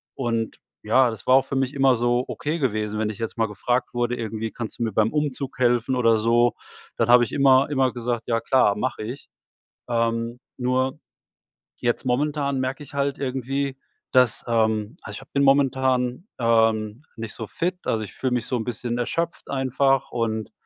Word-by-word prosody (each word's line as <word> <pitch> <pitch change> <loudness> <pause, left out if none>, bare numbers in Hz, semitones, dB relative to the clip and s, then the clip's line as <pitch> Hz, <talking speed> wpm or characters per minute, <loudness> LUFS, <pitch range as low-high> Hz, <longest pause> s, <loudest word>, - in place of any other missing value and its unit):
Und 115 -3 -2 0.3
ja, 125 +4 +4
das 110 -4 -10
war 130 - +6
auch 135 - +4
für 135 - -4
mich 135 +1 0
immer 135 -2 +4
so 120 +1 +1
ok - - -8 0.2
gewesen, 110 -5 -1
wenn 110 -1 0
ich 110 - -6
jetzt 115 +1 -4
mal 115 - +2
gefragt 115 +5 -1
wurde, 120 0 0
irgendwie: 110 -2 -4
„Kannst 115 0 -6
du - - 0
mir 115 - -1
beim 110 +2 +2
Umzug 145 -3 -2
helfen“ 120 +1 +2
oder 115 -3 +3
so, 120 +1 +3 0.4
dann 115 - +2
habe 120 0 +7
ich 120 - -3
immer 135 0 +4
immer 135 -3 +2
gesagt: 120 -1 -3
„Ja 115 -1 +1
klar, 115 -3 +3
mach 125 +3 -2
ich.“ 120 +6 -7 0.6
Ähm, 115 0 -1 0.2
nur 130 +1 0 0.8
jetzt 120 +1 0
momentan 140 +1 0
merke 130 +3 -3
ich 145 - -13
halt 140 0 -1
irgendwie, 135 +1 -2 0.3
dass 125 -3 +4
ähm, 110 +2 0
also - - -8
ich - - -9
hab 135 - -18
bin 140 - +2
momentan, 130 - +2
ähm, 115 -1 +2
nicht 115 -1 -6
so 110 - -6
fit, 180 - -2
also 110 -1 0
ich 100 - -8
fühle 130 -2 -1
mich 120 -2 -1
so 130 - -1
'n 110 - -3
bisschen 120 0 -3
erschöpft 165 +8 -2
einfach 135 0 +1
und, 110 -2 -2
125 Hz, 190 wpm, -24 LUFS, 115-135 Hz, 0.8 s, habe